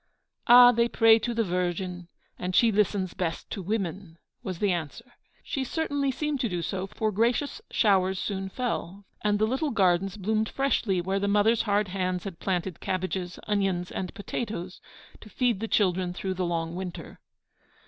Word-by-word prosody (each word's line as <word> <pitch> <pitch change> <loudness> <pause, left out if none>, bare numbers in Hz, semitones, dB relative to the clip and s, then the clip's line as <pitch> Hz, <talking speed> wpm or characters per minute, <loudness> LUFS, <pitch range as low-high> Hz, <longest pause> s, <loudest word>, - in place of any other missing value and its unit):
'Ah! 245 0 +9
they 235 0 +2
pray 225 -1 +5
to 240 +2 -2
the 230 -1 +1
Virgin, 180 -1 -2 0.3
and 180 0 -3
she 230 -2 +5
listens 195 -3 +1
best 175 -4 -3
to 200 - -4
women,' 190 -3 -3 0.2
was 185 -2 -5
the 200 +2 +1
answer. 175 - -5 0.3
She 270 - -2
certainly 285 0 -1
seemed 295 +2 -2
to 240 - 0
do 175 -2 -3
so, 190 +3 -3
for 215 +2 -2
gracious 235 +7 0
showers 190 -3 +2
soon 195 -1 -3
fell, 200 -5 -4 0.2
and 210 0 +2
the 215 - +2
little 265 +7 -1
gardens 195 -3 +2
bloomed 215 +2 0
freshly 235 -9 0
where 190 +3 -1
the 200 - -1
mothers' 210 +3 +3
hard 205 -1 +2
hands 185 -1 -2
had 190 -4 -7
planted 180 -2 -2
cabbages, 185 -1 -3
onions, 195 -3 0
and 185 -2 -4
potatoes 200 -3 -5 0.4
to 215 - -13
feed 235 0 0
the 225 - -3
children 185 -4 +1
through 190 +1 -3
the 185 -1 -2
long 165 -1 -2
winter. 180 0 -7
195 Hz, 170 wpm, -27 LUFS, 180-225 Hz, 0.4 s, Ah